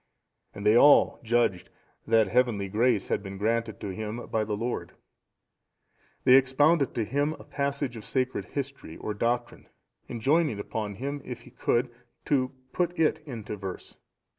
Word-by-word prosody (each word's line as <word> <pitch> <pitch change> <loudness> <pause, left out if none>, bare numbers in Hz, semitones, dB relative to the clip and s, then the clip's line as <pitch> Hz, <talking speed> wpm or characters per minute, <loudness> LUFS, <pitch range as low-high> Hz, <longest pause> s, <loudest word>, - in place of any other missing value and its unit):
And 100 - -7
they 105 +1 +6
all 145 +4 +6
judged 115 -6 +1 0.4
that 110 -2 +4
heavenly 110 -2 +1
grace 110 0 +1
had - - 0
been 100 -1 -7
granted 115 +2 -1
to 100 - -4
him 110 +4 -5
by 110 - -1
the 105 -1 -3
Lord. 120 +3 -3 1.3
They 130 - +6
expounded 140 +3 +3
to 115 -3 0
him 145 +6 0
a - - -12
passage 140 -2 -2
of 110 - -8
sacred 130 +2 -1
history 140 - -6
or 105 - -4
doctrine, 120 +3 -2 0.4
enjoining 135 0 +1
upon 105 0 -4
him, 140 +6 -4
if 125 -1 -7
he 125 - -15
could, 120 +2 0 0.3
to 130 -3 +1 0.2
put 175 0 -1
it 160 -1 +2
into 115 -5 -6
verse. 95 -2 -7
120 Hz, 155 wpm, -28 LUFS, 105-135 Hz, 1.3 s, they